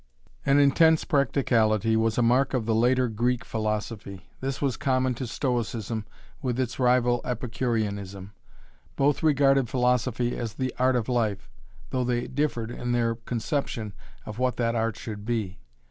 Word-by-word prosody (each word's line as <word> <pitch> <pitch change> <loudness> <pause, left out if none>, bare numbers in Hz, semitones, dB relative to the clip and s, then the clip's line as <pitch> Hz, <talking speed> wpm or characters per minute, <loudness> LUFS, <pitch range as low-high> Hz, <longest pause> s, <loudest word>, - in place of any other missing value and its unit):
An 140 0 +5
intense 160 +3 +5
practicality 115 -6 +2
was 110 0 +1
a 120 - +3
mark 130 +3 +3
of 120 -4 -1
the 115 - +1
later 125 +3 +3
Greek 120 +2 -1
philosophy. 105 -3 -4
This 135 0 -3
was 135 -4 0
common 130 -1 +1
to 125 +1 -5
Stoicism 115 -3 -2 0.3
with 125 -3 -2
its 125 -1 -2
rival 125 -1 +3
Epicureanism. 110 -5 -3 0.6
Both 140 +1 +2
regarded 135 -5 +3
philosophy 125 -1 +1
as 115 -3 -4
'the 130 -1 -2
art 130 0 +3
of 120 -3 0
life,' 115 -6 -1 0.4
though 130 - 0
they 120 -1 0
differed 130 -5 -2
in 120 0 -3
their 115 -1 +1
conception 115 -1 -3 0.3
of 105 +2 -7
what 125 -1 +1
that 115 -1 +1
art 115 -2 -1
should 105 -2 -7
be. 105 -4 -2
120 Hz, 150 wpm, -26 LUFS, 110-130 Hz, 0.6 s, An